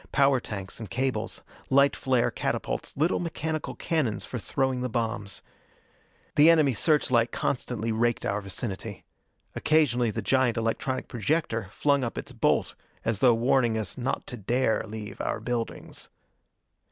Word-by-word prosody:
Power 140 -2 +4
tanks 100 -4 -6
and 110 - -7
cables. 125 -4 -2 0.3
Light 140 +1 +5
flare 130 -3 +1
catapults - - -3
little 160 +5 +2
mechanical 160 -2 -3
cannons 135 - -1
for 125 - -5
throwing 130 +3 -1
the 125 - -1
bombs. 110 -3 -3 0.9
The 150 +3 +8
enemy 155 -5 +5
search 150 +4 +2
light 115 -1 +3
constantly 115 -4 -2
raked 120 +1 +1
our 100 +1 0
vicinity. 100 +1 -5 0.5
Occasionally 125 -7 +3
the 105 - -3
giant 130 -3 +2
electronic 115 +3 -1
projector 115 - -1
flung 140 +5 +1
up 120 - -3
its - - -5
bolt - - +1 0.3
as 110 -3 0
though 125 -2 +5
warning 120 -1 +2
us 110 -4 -3
not 125 0 -2
to 125 - -7
dare 120 +2 +1
leave 105 -1 -7
our - - -1
buildings. 120 -2 -4
120 Hz, 145 wpm, -27 LUFS, 110-135 Hz, 0.9 s, The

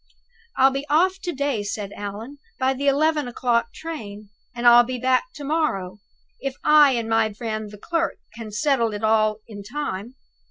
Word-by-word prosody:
"I'll 265 +1 +5
be 275 +1 -3
off 370 +6 +2
to 355 - -3
day," 280 -6 -1
said 205 0 -4
Allan, 210 +8 -7 0.2
"by 260 -1 +1
the 280 +2 -3
eleven 300 0 +2
o'clock 240 -1 0
train. 215 -11 -8 0.3
And 240 0 -4
I'll 240 0 +8
be 250 +1 -4
back 255 - +2
to 290 - -8
morrow, 275 - -1 0.4
if 270 -1 -4
I 300 -2 +6
and 230 -2 -2
my 225 -1 +2
friend 215 -1 -4
the 210 - -11
clerk 330 +9 -2 0.2
can 225 -2 -7
settle 230 0 +1
it 205 - -7
all 215 -1 +2
in 205 -3 -9
time. 230 -1 -5
240 Hz, 175 wpm, -23 LUFS, 215-285 Hz, 0.4 s, I'll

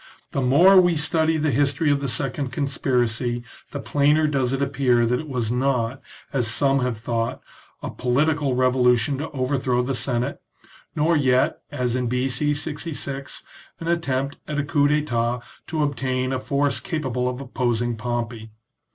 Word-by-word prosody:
The 140 - -1
more 175 +10 +7
we 175 -2 +2
study 160 +1 +1
the 155 -1 +1
history 145 +3 +2
of 140 - +2
the 140 - -3
second 135 +3 -2
conspiracy 125 -4 0 0.3
the 140 - -5
plainer 150 +3 +2
does 135 -4 +1
it 135 - -1
appear 135 -4 +2
that 125 +2 +1
it 155 - -7
was 120 -4 -1
not, 125 0 0 0.3
as 125 -4 +1
some 135 +5 +2
have 125 -3 -1
thought, 115 +1 -2 0.4
a - - -4
political 140 +2 +1
revolution 125 0 +3
to 155 - -4
overthrow 130 -2 0
the 135 +2 -2
Senate, 125 -1 -2 0.5
nor 160 +3 +2
yet, 130 -3 +2
as 125 -4 -1
in 125 -1 0
B.C. 130 +4 +1
66, 145 -2 -4 0.4
an 165 - -6
attempt 140 -5 -1
at 150 - -3
a 140 - +1
cottp 145 +1 +2
(Tetat 120 -1 -1 0.2
to 155 -2 -1
obtain 130 -2 -1
a 130 - -1
force 140 +1 0
capable 130 -6 -2
of 125 0 -5
opposing 120 -3 -1
Pompey. 115 -1 -4
135 Hz, 160 wpm, -23 LUFS, 125-145 Hz, 0.5 s, more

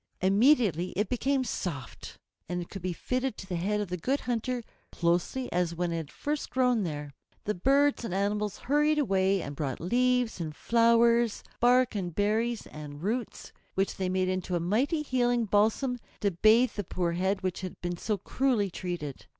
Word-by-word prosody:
Immediately 195 - +3
it 210 +1 0
became 265 +2 +1
soft, 165 - -5 0.3
and 175 -1 -3
could 195 - -7
be 185 +1 -2
fitted 255 +7 -2
to - - -8
the 185 - -3
head 200 +5 0
of 205 -3 -3
the 180 - -2
Good 265 - -1
Hunter 245 0 -2 0.3
closely 175 +9 0
as 175 -1 0
when 175 0 -1
it 165 - -1
had 160 -3 -6
first 295 0 -3
grown 250 -3 +2
there. 150 -5 -4 0.3
The 210 - -1
birds 275 +8 +2
and 230 - -4
animals 205 +2 -1
hurried 295 +3 +2
away 195 - +2
and 140 - -6
brought 135 -3 -3
leaves 245 +2 +1
and 155 -2 -4
flowers, 235 +1 +3 0.2
bark 250 +1 +4
and 180 -5 -3
berries 220 +3 0
and 150 0 -9
roots, 230 +3 -3 0.2
which 195 +1 0
they 185 -1 -1
made 185 0 +1
into 185 -1 -1
a - - +1
mighty 250 - +1
healing 245 -4 +1
balsam 220 +5 +1 0.2
to 200 -2 +2
bathe 220 +7 +4
the 205 - -4
poor 175 -1 -1
head 190 +3 -1
which 185 -1 -2
had 185 -1 -7
been 175 0 -3
so 210 +3 -1
cruelly 220 -1 0
treated. 170 -7 -5
205 Hz, 180 wpm, -29 LUFS, 180-245 Hz, 0.3 s, bark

